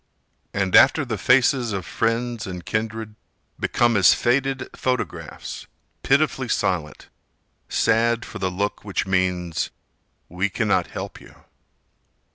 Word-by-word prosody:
And 95 -2 0
after 140 +2 +6
the 115 -3 -2
faces 125 0 +3
of 95 -3 -3
friends 115 0 -1
and 90 -2 -7
kindred 110 0 -3 0.5
Become 120 -1 +2
as 95 -3 +6
faded 135 +2 0
photographs, 125 -2 -4 0.3
pitifully 135 -2 +2
silent, 90 - -2 0.6
Sad 115 +1 +2
for 115 - -8
the 95 -1 0
look 100 +3 -3
which 100 -2 -2
means: 90 -3 0 0.6
"We 90 +4 -1
cannot 100 -4 +1
help - - -7
you." - - -16
110 Hz, 115 wpm, -23 LUFS, 95-120 Hz, 0.6 s, after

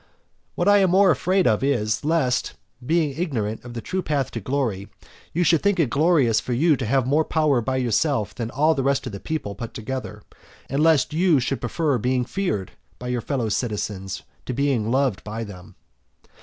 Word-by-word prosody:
XIV. - - -39
What 175 - 0
I 205 0 +7
am 190 -2 +3
more 190 +1 +5
afraid 185 +5 +1
of 110 +3 +2
is 115 -6 0
lest, 150 -5 +1 0.3
being 160 +2 +1
ignorant 120 - -2
of 120 -1 -9
the 115 - -4
true 190 +9 -2
path 145 -6 -1
to 115 - -4
glory, 115 -5 -2 0.4
you 175 - +1
should 165 -2 +3
think 200 -2 +1
it 140 -8 +2
glorious 140 -7 +3
for 125 - -4
you 155 +5 +3
to - - -3
have 130 +1 +2
more 145 +5 +2
power 155 -6 +1
by 130 +3 -1
yourself 125 -1 0
than 115 -2 -4
all 150 +6 +2
the 140 - -1
rest 140 0 0
of 125 - -5
the 100 - -7
people 145 -9 -4
put 115 +1 -8
together, 110 -2 -5 0.4
and 140 +3 -1
lest 155 -4 +3
you 165 -2 +3
should 130 +2 -2
prefer 140 +2 0
being 125 +2 0
feared 175 - -2 0.3
by 125 - -6
your 125 -1 -1
fellow 125 -2 -2
citizens 105 -4 -3 0.2
to 125 - -3
being 130 -5 0
loved 130 -6 +1
by 110 +2 -5
them. 95 -4 -11
130 Hz, 200 wpm, -23 LUFS, 115-155 Hz, 0.4 s, I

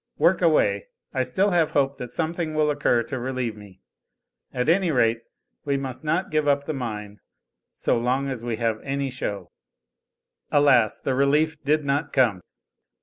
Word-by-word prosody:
Work - - +3
away. - - +2 0.3
I - - 0
still 200 +2 +1
have 170 -3 +3
hope 140 0 +1
that 125 - -6
something 165 -1 -2
will 155 -1 +2
occur 135 -5 +1
to 130 +1 -5
relieve 125 -3 -3
me. 100 -3 -15 0.7
At 125 +1 -2
any 180 +2 +3
rate 115 -5 +2 0.4
we 140 -1 0
must 135 +1 -5
not 170 +5 -1
give 155 -1 +1
up 140 0 +2
the 155 - -3
mine, 105 -6 -5 0.6
so - - +1
long 130 +3 0
as 130 -4 -4
we 120 -2 -2
have 115 -2 -1
any 140 0 -2
show." 105 -6 -5 1.0
Alas! 130 -7 +4
the 135 - -1
relief 150 +4 +2
did 150 +1 +1
not 145 +2 -1
come. 115 -9 +2
140 Hz, 165 wpm, -24 LUFS, 120-150 Hz, 1.0 s, Alas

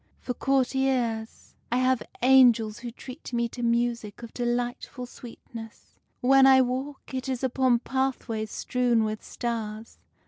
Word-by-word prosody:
For 250 - -4
courtiers, 260 -4 0 0.2
I 245 - +2
have 255 -1 +2 0.2
angels 240 -5 +5
who 240 - -6
treat 255 +4 -10
me 235 0 +1
to 245 - -8
music 235 -2 -1
of 235 - -9
delightful 245 +1 -2
sweetness. 230 -2 -12 0.2
When 270 +1 +6
I 265 -1 +7
walk, 260 +3 -2
it 260 +1 -3
is 260 0 -3
upon 260 -1 +3
pathways 255 -4 -2
strewn 245 -1 +1
with 215 0 -3
stars. 225 -2 -5
245 Hz, 135 wpm, -27 LUFS, 230-260 Hz, 0.2 s, I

